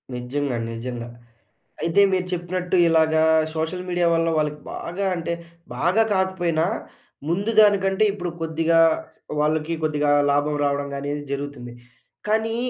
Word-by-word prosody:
నిజ్జంగా 125 +1 -2
నిజంగా. 120 +1 -5 0.7
అయితే 165 +5 +3
మీరు 185 -1 0
చెప్పినట్టు 180 +1 -2
ఇలాగా 160 -1 +3 0.3
సోషల్ 160 +3 -3
మీడియా 175 -1 +1
వల్ల 165 0 +1
వాళ్ళకి 150 -1 -1
బాగా 185 +4 -4
అంటే, 170 0 -3 0.4
బాగా 185 +6 +2
కాకపోయినా 175 -4 0 0.6
ముందు 200 +6 0
దానికంటే 195 -1 +3
ఇప్పుడు 180 -3 -4
కొద్దిగా 165 +1 +2 0.6
వాళ్ళకి 155 +2 0
కొద్దిగా 150 -1 +1 0.2
లాభం 145 +1 +1
రావడం 140 0 0
గానీ 140 +1 -5
ఇది 145 - -6
జరుగుతుంది. 140 -4 -5 0.5
కానీ 220 +1 +1
165 Hz, 125 wpm, -23 LUFS, 145-180 Hz, 0.7 s, అయితే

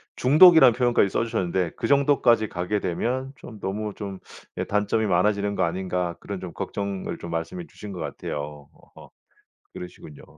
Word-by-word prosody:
중독이란 150 -2 +7
표현까지 120 -5 +2
써 - - 0
주셨는데 95 -6 -1
"그 115 - -2
정도까지 135 -6 +3
가게 90 +4 -2
되면 125 +9 -2
좀 110 -5 -12
너무 105 +2 -4
좀 100 -3 -7 0.4
예 - - -1
단점이 105 +2 0
많아지는 100 +2 +1
거 - - +1
아닌가." 90 0 -2
그런 100 -2 -6
좀 90 -2 -7
걱정을 100 +1 -4
좀 85 - -8
말씀해 85 - -4
주신 105 -9 -10
것 90 - -7
같아요. 75 -1 -6 0.3
어 - - -14 0.6
그러시군요. 80 -4 -10
100 Hz, 345 characters per minute, -24 LUFS, 90-115 Hz, 0.6 s, 중독이란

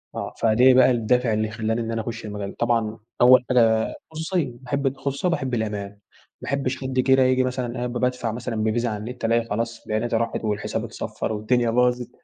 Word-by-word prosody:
آه، - - -4
فدي 120 +4 +5
بقى 130 0 +6
الدَّافع 120 0 +1
اللي 110 0 0
خلَّاني 110 +1 -2
إني 115 0 -3
أنا 115 - -1
أخُش 110 0 -6
المجال 105 -1 -5
طبعًا 115 -2 0 0.2
أول 125 0 +7
حاجة 115 -3 +3 0.2
الخُصوصيَّة، 160 -3 -2
باحب 140 +1 -1
الخُصوصيَّة 140 +5 -2
وباحب 135 -7 -2
الأمان، 105 -3 -2
ما 100 - -24 0.4
باحبِّش 135 -1 -2
حد 130 -1 -3
كده 130 0 +4
ييجي 130 0 +3
مثلًا 125 -2 -2
قاعد 125 0 -2
ب - - -2
بادفع 125 -2 -1
مثلًا 120 0 -4
بالفيزا 110 +2 0
على 105 - -3
النت 120 +4 -6
ألاقي 115 0 +2
خلاص 115 +2 -3
بياناتي 110 +2 -1
راحت، 115 0 -1
والحساب 105 -2 -2
اتصَفَّر، 110 - -4
والدنيا 115 +3 +1
باظت، 125 +1 +1
120 Hz, 190 wpm, -23 LUFS, 110-130 Hz, 0.4 s, أول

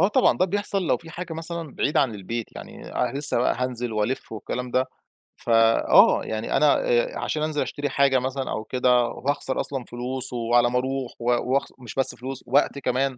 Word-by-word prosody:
آه، 190 - +5
طبعًا 260 +4 +3
ده - - +4
بيحصل 200 +1 -1
لو - - +3
في 165 -1 -13
حاجة 175 -1 -6
مثلًا 165 -2 -5
بعيد 145 - -1
عن 120 -5 +2
البيت، 110 +4 -4
يعني - - -10
أنا 140 - -1
لسه 145 -4 +3
بقى 125 - +2
هانزل 125 -2 -2
وألِف 110 +3 -2
والكلام 125 +4 -5
ده، 130 +2 +1 0.5
فآه، 115 -1 +4
يعني 110 +1 -2
أنا 150 - +5
آآ - - +1
عشان 155 0 -2
أنزل 155 -1 -1
أشتري 145 0 -3
حاجة 140 -2 +3
مثلًا 130 +1 -3
أو 110 - -3
كده، 125 0 +2
وهاخسر 135 +2 -2
أصلًا 135 -3 -4
فلوس، 125 +1 -1
وعلى 120 0 +2
ما 125 +1 +1
أروح، 130 -1 -3
و 115 - -7 0.3
وأخسر 140 - -1
مش 120 -3 -9
بس 135 -1 +1
فلوس، 130 +1 -7
وقت 140 +2 +2
كمان، 130 0 -1
130 Hz, 195 wpm, -24 LUFS, 120-145 Hz, 0.5 s, آه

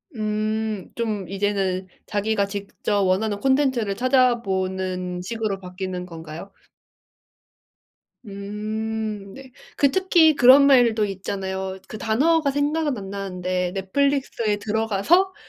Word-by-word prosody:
음 215 -1 -2
좀 215 -6 -2
이제는 195 -2 -1 0.2
자기가 205 0 0
직접 200 +1 -2
원하는 200 +2 +1
콘텐츠를 260 -6 +1
찾아보는 190 -8 0
식으로 215 -1 -3
바뀌는 180 0 -5
건가요? 165 +2 -9 1.7
음. 210 0 -4
네. 265 +2 -12 0.2
그 280 -2 +3
특히 345 -3 +4
그런 265 +2 +7
말도 240 -5 +5
있잖아요. 190 -1 -4
그 215 - -6
단어가 285 +8 +2
생각은 290 -1 0
안 195 -1 -7
나는데 185 -2 -3
넷플릭스에 230 +1 0
들어가서 225 - +1
210 Hz, 245 characters per minute, -23 LUFS, 190-245 Hz, 1.7 s, 그런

